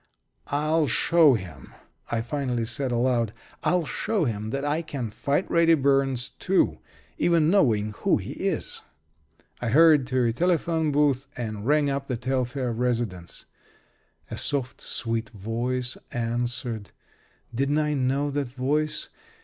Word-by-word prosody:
"I'll 155 +2 +1
show 155 +2 +5
him!" 90 - -8 0.3
I 115 - 0
finally 125 -3 -2
said, 125 +3 -1
aloud. 120 -2 +1 0.3
"I'll 180 -2 +2
show 180 - -1
him 110 -3 -3
that 140 +4 -2
I 150 +3 0
can 135 -9 -5
fight 140 - 0
Reddy 165 -1 +4
Burns, 135 -3 +1
too 190 +1 +2 0.4
even 170 -2 +3
knowing 110 - +3
who - - +3
he - - -6
is." - - -3 0.8
I 120 - -1
hurried 150 0 +6
to 130 -2 +1
a 115 - +1
telephone 165 +1 +1
booth 140 -2 +2
and 110 -2 -4
rang 150 0 +3
up 140 0 -3
the 125 - -2
Telfair 125 0 -1
residence. 115 -7 -2 0.9
A - - -4
soft, 135 -4 -1
sweet 115 -1 -2
voice 120 +4 -2
answered. 120 -2 -2 0.6
Didn't 140 +5 +1
I 150 -1 +1
know 140 +1 0
that 140 -2 -2
voice? 145 +5 -1
130 Hz, 135 wpm, -26 LUFS, 120-150 Hz, 0.9 s, hurried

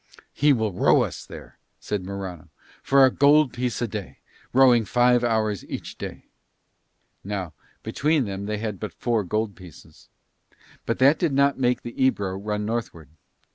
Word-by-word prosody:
"He 145 +1 +3
will 110 -6 0
row - - +4
us - - -7
there," - - -12 0.2
said 105 -3 -4
Morano, 95 -4 -7 0.3
"for 135 0 +5
a 130 - +3
gold 145 -1 +4
piece 120 0 -2
a - - 0
day, 105 -3 -7 0.3
rowing 125 -3 +5
five 120 +3 +3
hours 110 -4 0
each - - -7
day." - - -7 1.0
Now 95 -5 -4 0.3
between 150 -1 0
them 100 0 -5
they 105 0 -2
had 105 -3 -4
but 105 -6 -6
four 115 -3 0
gold 105 +3 -2
pieces; 90 -7 -16 0.8
but 115 - 0
that 140 +4 +4
did 165 -5 0
not 140 0 +2
make 125 -1 +1
the 120 - -7
Ebro 100 -8 +1
run 105 +1 -3
northward. 105 - -4
110 Hz, 160 wpm, -24 LUFS, 100-130 Hz, 1.0 s, for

